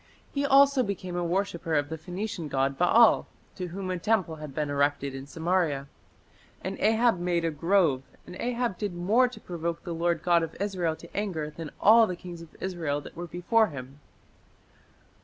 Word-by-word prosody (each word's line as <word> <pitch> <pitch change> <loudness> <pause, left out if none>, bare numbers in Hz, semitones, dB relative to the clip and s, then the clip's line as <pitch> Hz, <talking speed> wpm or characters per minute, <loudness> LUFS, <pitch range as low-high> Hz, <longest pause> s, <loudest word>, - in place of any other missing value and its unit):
He 280 - 0
also 275 0 +6
became 190 -5 -3
a 175 - -1
worshipper 170 -2 -1
of 145 -1 +1
the 160 - -4
Phoenician 180 +1 -5
god 135 0 0
Baal, 220 +8 +5 0.3
to 180 -2 -4
whom 185 +2 -5
a 180 - -2
temple 185 -5 0
had 150 -2 -8
been 145 +1 -2
erected 140 -1 0
in 135 +1 -7
Samaria. 160 -3 0 0.8
"And 190 +1 -3
Ahab 225 -2 +3
made 175 -1 0
a 165 - +1
grove; 165 -3 +2 0.2
and 180 - -10
Ahab 240 -4 -1
did 205 -4 -3
more 215 +9 +3
to 250 - -10
provoke 170 -1 -4
the 175 - -4
Lord 170 -1 0
God 170 -1 +4
of 165 - -5
Israel 185 -5 -1
to 170 - -15
anger 175 -7 -2
than 160 0 -7
all 225 +1 +7
the 180 - -3
kings 175 -1 -9
of 165 - -14
Israel 165 -6 -2
that - - -12
were 175 +1 -6
before 200 +7 +2
him." 135 -2 -9
175 Hz, 185 wpm, -28 LUFS, 160-200 Hz, 0.8 s, all